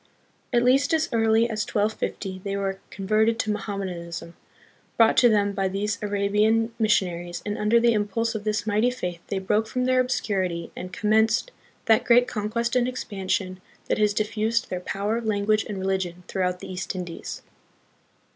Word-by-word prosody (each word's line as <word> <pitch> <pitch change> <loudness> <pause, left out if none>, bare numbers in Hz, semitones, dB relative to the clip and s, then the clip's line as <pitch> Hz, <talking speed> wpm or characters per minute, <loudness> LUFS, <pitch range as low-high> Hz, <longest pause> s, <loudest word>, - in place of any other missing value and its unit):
At 240 -1 +3
least 275 +5 +4
as 315 -1 +1
early 225 0 +3
as 215 -2 -2
1250 205 -2 -2
they 200 -1 -2
were 195 -1 -2
converted 215 +3 +1
to 215 - 0
Mohammedanism, 180 -5 -5 0.6
brought 225 -1 +5
to 245 - +7
them 205 -2 +2
by 195 -1 0
these 200 +2 -2
Arabian 210 +3 +1
missionaries, 175 -6 0
and 205 0 -2
under 210 +3 +3
the 235 0 +4
impulse 225 +2 0
of 215 -2 -4
this 210 0 -1
mighty 215 +3 +2
faith 180 -9 -5
they 195 - -2
broke 210 +3 0
from 250 +2 -1
their 255 0 +3
obscurity 190 -9 -1
and 180 0 -7
commenced 220 - +2 0.3
that 225 -1 +4
great 245 +1 +5
conquest 235 +3 -2
and 250 -1 +3
expansion 190 -6 -3 0.3
that - - +1
has 210 -1 +2
diffused 220 +2 0
their 180 - -2
power, 205 +5 -2
language, 215 -1 +1
and 205 - -4
religion 190 -2 -2
throughout 180 -1 -1
the - - -7
East 185 +1 -4
Indies. 175 -2 -6
210 Hz, 165 wpm, -25 LUFS, 190-225 Hz, 0.6 s, to